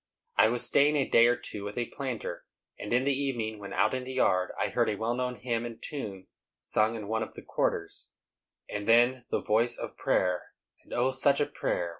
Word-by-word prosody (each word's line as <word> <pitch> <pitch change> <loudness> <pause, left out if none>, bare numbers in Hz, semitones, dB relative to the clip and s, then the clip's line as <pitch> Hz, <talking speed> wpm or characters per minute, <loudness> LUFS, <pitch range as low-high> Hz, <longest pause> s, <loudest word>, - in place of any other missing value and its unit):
I 110 - +6
was 120 +1 +2
staying 145 +2 +4
a 140 -2 +2
day 115 0 +6
or 120 - +3
two 110 -4 -7
with 100 +2 -6
a 120 - 0
planter, 130 -4 -5 0.3
and 105 - -6
in 125 +2 +3
the 140 +1 +2
evening, 120 -6 -2
when 100 -1 -8
out - - +2
in 130 0 -2
the 130 +1 -6
yard, 90 -7 +2
I - - +1
heard - - +1
a 105 - -1
well 110 +3 -1
known 125 0 -2
hymn 120 -2 -2
and 120 -1 -7
tune 100 -10 -6 0.3
sung 110 +1 +1
in 105 -3 -6
one 110 +1 -1
of - - -5
the - - -10
"quarters," - - -2 0.6
and 105 0 -5
then 120 +2 +4
the - - -1
voice 115 +3 +3
of - - -7
prayer; 90 -1 0 0.3
and - - -21
O, 125 +2 +1
such 135 +1 +3
a 145 - +3
prayer! 85 -9 -2
120 Hz, 220 wpm, -29 LUFS, 110-130 Hz, 0.6 s, I